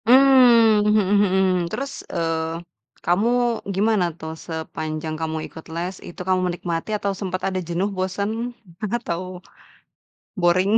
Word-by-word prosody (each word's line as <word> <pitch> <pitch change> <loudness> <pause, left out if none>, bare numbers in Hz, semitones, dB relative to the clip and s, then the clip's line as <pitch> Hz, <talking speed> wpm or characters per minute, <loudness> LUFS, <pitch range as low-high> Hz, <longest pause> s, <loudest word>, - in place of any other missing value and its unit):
Mmm, 245 -4 +7
mhm 210 0 +5 0.2
mhm. 190 -1 +2 0.3
Terus, 275 +9 -4 0.2
eee, 165 -1 -1 0.5
kamu 180 +6 +2 0.5
gimana 205 -1 +2
tuh, 160 -1 -6
sepanjang 160 -1 -4
kamu 160 0 -2
ikut 160 - -12
les, 180 +3 -3
itu 175 - -9
kamu 185 0 +3
menikmati 175 0 -3
atau 200 -1 -1
sempet 185 -2 -3
ada 190 -1 -1
jenuh, 180 +4 0
bosen? 190 +2 -1 0.7
Atau, 180 -8 -3 1.2
boring? 180 +3 +3
185 Hz, 120 wpm, -22 LUFS, 165-210 Hz, 1.2 s, Mmm